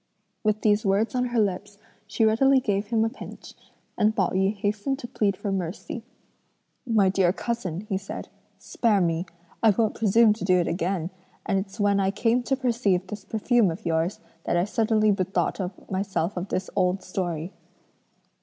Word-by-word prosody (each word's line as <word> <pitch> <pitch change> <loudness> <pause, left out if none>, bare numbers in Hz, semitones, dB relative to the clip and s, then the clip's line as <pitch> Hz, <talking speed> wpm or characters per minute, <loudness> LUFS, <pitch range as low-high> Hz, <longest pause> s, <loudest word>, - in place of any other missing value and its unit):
With 215 0 +1
these 210 0 +3
words 200 +3 +1
on 250 0 +1
her 240 -1 0
lips, 205 0 -1 0.3
she 220 +1 +1
readily 265 +5 +4
gave 205 -4 -1
him 225 0 +2
a - - 0
pinch, - - -11 0.4
and 215 +1 +2
Pao 190 -3 +2
yü 190 +2 +1
hastened 205 +6 -1
to 250 - -7
plead 200 -4 0
for 205 0 -3
mercy. 190 +5 -4 0.9
"My 215 -4 +4
dear 185 -2 +3
cousin," 195 -5 -3
he 200 -2 -3
said, 195 - -7 0.3
"spare 220 -4 +1
me; 170 0 0 0.3
I 225 - +6
won't 215 +1 +2
presume 225 0 +4
to 215 - -8
do 185 -1 +3
it 175 - +1
again; 175 0 -1 0.3
and 195 -2 +1
it's 195 +3 -7
when 200 -1 +3
I 190 -1 +2
came 225 +4 +1
to 270 - +1
perceive 230 -8 +1
this 200 +1 -7
perfume 220 +1 +2
of 165 - -6
yours, 165 +3 0 0.3
that - - +1
I 175 - +3
suddenly 215 0 +2
bethought 190 -1 -2
myself 190 -2 -1
of 180 +1 -3
this 185 0 -2
old 185 +1 +1
story." 175 -2 -3
200 Hz, 175 wpm, -25 LUFS, 185-220 Hz, 0.9 s, I